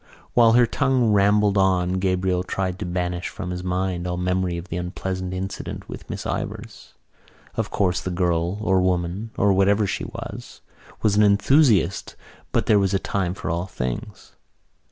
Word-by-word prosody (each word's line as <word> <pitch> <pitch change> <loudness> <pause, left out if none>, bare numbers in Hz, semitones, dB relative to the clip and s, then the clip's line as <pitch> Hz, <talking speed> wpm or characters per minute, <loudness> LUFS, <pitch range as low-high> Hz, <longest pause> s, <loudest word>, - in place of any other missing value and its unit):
While 115 -2 +6
her 120 0 +6
tongue 130 -2 +1
rambled 100 0 +3
on 95 -1 +2
Gabriel 95 -1 +1
tried 95 0 -3
to 100 - -4
banish 90 0 -2
from 90 - -6
his 90 0 -5
mind 90 -1 -2
all 90 0 -2
memory 90 -1 0
of 85 +2 -8
the 85 - -3
unpleasant 90 +1 -4
incident 95 +1 -5
with - - -9
Miss - - -5
Ivors. - - -5 0.6
Of - - -2
course 90 -2 0
the - - -4
girl 85 0 0
or 95 -3 +2
woman, 90 +4 -1
or 100 0 +4
whatever 100 +2 +3
she - - -3
was, - - -8 0.4
was 105 -2 +3
an 105 - +4
enthusiast 105 - +3 0.4
but - - +1
there 105 -2 +4
was 100 0 +1
a - - +4
time 95 -2 -2
for - - -4
all 85 +2 -2
things. 65 -8 -5
95 Hz, 170 wpm, -23 LUFS, 90-100 Hz, 0.6 s, While